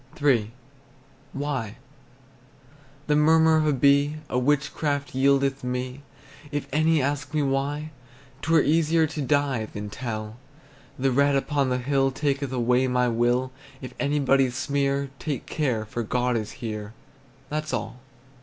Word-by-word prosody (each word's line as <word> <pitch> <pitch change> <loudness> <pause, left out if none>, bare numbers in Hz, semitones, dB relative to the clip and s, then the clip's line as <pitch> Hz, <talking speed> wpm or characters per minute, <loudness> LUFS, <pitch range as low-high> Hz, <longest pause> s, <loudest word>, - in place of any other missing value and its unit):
III. 120 -7 +2 0.8
WHY? 135 -6 -3 1.3
The 150 - +2
murmur 160 +1 +5
of 155 -1 +2
a - - +4
bee 140 +2 +3
A 125 - +1
witchcraft 145 +1 0
yieldeth 135 0 +2
me. 125 +2 -3 0.5
If 145 -1 -3
any 155 -1 +3
ask 140 +1 -2
me 150 - +2
why, 140 +3 -1 0.5
'T 160 - -2
were 160 -3 +5
easier 160 +1 +3
to 155 -1 -4
die 140 -5 +1
Than 105 -1 -7
tell. 110 -2 -5 0.6
The 135 0 +1
red 140 +2 +3
upon 140 0 0
the 125 - +1
hill 135 +1 +1
Taketh 140 0 -1
away 125 +1 +2
my 125 -1 +2
will; 120 +2 +1 0.3
If 130 -2 -8
anybody 140 -2 +2
sneer, 140 +1 -1
Take 145 -6 -4
care, 125 -8 -1
for 120 +2 -4
God 125 +2 0
is 110 -2 -3
here, 105 -1 -6 0.6
That's 155 0 -2
all. 125 - -4
135 Hz, 140 wpm, -25 LUFS, 125-145 Hz, 1.3 s, murmur